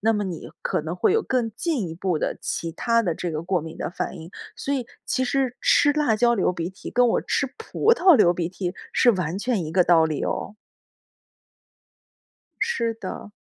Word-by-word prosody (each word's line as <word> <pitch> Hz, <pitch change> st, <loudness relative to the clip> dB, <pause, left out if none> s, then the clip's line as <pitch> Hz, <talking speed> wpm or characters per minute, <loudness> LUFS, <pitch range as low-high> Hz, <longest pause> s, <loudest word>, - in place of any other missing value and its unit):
那 225 Hz, +2 st, +3 dB
么 210 Hz, -1 st, -1 dB
你 180 Hz, -5 st, -6 dB
可 -, -, 0 dB
能 160 Hz, +3 st, -4 dB
会 180 Hz, -, +2 dB
有 450 Hz, -, +3 dB
更 250 Hz, -, -1 dB
进 240 Hz, -, -2 dB
一 -, -, -6 dB
步 180 Hz, -1 st, -1 dB
的 -, -, -2 dB
其 165 Hz, -, -3 dB
它 230 Hz, +7 st, +1 dB
的 170 Hz, -6 st, -1 dB
这 175 Hz, -2 st, -3 dB
个 155 Hz, 0 st, -3 dB
过 180 Hz, +1 st, 0 dB
敏 160 Hz, +1 st, -8 dB
的 -, -, -4 dB
反 185 Hz, -, -4 dB
应。 165 Hz, 0 st, -10 dB, 0.2 s
所 280 Hz, -, -3 dB
以 260 Hz, -4 st, -1 dB, 0.2 s
其 260 Hz, -, 0 dB
实 260 Hz, -1 st, 0 dB
吃 290 Hz, -, +4 dB
辣 290 Hz, -6 st, +2 dB
椒 235 Hz, +2 st, +3 dB
流 190 Hz, -4 st, +1 dB
鼻 170 Hz, 0 st, -4 dB
涕 190 Hz, -, -10 dB
跟 245 Hz, 0 st, +3 dB
我 -, -, +2 dB
吃 280 Hz, -, -1 dB
葡 450 Hz, 0 st, +2 dB
萄 375 Hz, -7 st, +6 dB
流 175 Hz, -7 st, +5 dB
鼻 170 Hz, -1 st, -2 dB
涕 180 Hz, 0 st, -4 dB, 0.2 s
是 245 Hz, -, +5 dB
完 180 Hz, -5 st, -2 dB
全 210 Hz, -3 st, -1 dB
一 155 Hz, -, -6 dB
个 180 Hz, +1 st, +5 dB
道 170 Hz, -2 st, +5 dB
理 155 Hz, -3 st, -2 dB
哦。 210 Hz, -, -3 dB, 2.1 s
是 235 Hz, -, 0 dB
的。 205 Hz, -1 st, -7 dB
200 Hz, 225 characters per minute, -24 LUFS, 170-245 Hz, 2.1 s, 萄